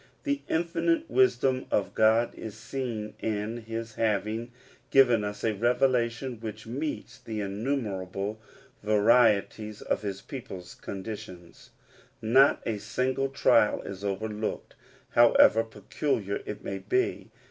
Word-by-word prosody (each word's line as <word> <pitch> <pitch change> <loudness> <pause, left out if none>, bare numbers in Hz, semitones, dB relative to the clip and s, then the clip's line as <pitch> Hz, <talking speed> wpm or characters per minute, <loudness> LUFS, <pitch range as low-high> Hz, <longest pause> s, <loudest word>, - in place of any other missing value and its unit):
The 285 -1 -1
infinite 300 - +1
wisdom 135 - +2
of 100 - 0
God 110 +2 +3
is 110 -2 -8
seen 110 -4 -4
in 110 +1 -2
his 115 0 -6
having 110 +2 -1 0.4
given 125 -5 +5
us 105 0 -5
a 110 - +2
revelation 120 +1 +1
which 110 -2 -7
meets 140 +7 -5
the 110 -1 -5
innumerable 100 -2 -3 0.4
varieties 105 0 +3
of - - -1
his 100 -2 -4
people's 95 -9 -8
conditions. 95 -4 -8 0.5
Not 130 +6 +4
a 110 -3 -2
single 130 +6 -1
trial 135 - +3
is 100 0 -7
overlooked, 105 +2 -3 0.4
however 115 -1 +6
peculiar 105 0 -2
it 105 - -6
may 95 0 -4
be. 380 - -1
110 Hz, 115 wpm, -28 LUFS, 105-125 Hz, 0.5 s, however